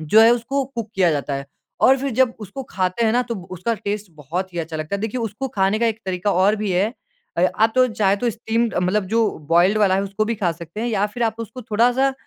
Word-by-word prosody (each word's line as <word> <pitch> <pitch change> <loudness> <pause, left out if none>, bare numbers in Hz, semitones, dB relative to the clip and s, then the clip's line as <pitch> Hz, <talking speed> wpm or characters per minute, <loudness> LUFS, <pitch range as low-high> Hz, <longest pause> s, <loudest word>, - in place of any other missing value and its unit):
जो 185 +8 +5
है 225 +1 +8
उसको 255 +4 -1
कुक 235 -5 -6
किया 185 -3 +3
जाता 145 -1 -2
है। 140 0 -5 0.3
और 265 0 +5
फिर 275 +1 -2
जब 255 0 +2
उसको 215 +6 -7
खाते 185 +4 0
हैं 220 - +2
ना 245 - +3
तब 195 -6 -4
उसका 185 +6 -1
टेस्ट 205 -2 -4
बहुत 175 +6 -4
ही - - -3
अच्छा 160 -1 -4
लगता 155 +5 -3
है। - - -7
देखिए 225 +3 -2
उसको 225 +4 -3
खाने 195 +2 +2
का 235 - +3
एक 225 0 -1
तरीका 185 +2 0
और 195 +4 +3
भी 210 -1 -2
है। 195 +6 +1 0.5
अ, 175 - +3
आप 220 +1 +3
तो 255 0 +5
चाहे 205 -3 +1
तो 235 +3 0
स्टीम्ड 230 +1 -1
मतलब 190 +3 +1
जो 230 -2 +4 0.2
बॉयल्ड 180 +5 +4
वाला 200 -3 +4
है 195 - +1
उसको 200 +2 -1
भी 230 - -1
खा 180 -5 0
सकते 170 +5 -8
हैं 240 - -1
या 210 -3 +1
फिर 240 - -2
आप 225 0 -2
उसको 230 +3 -7
थोड़ा-सा 245 +5 +2
215 Hz, 255 wpm, -21 LUFS, 185-230 Hz, 0.5 s, है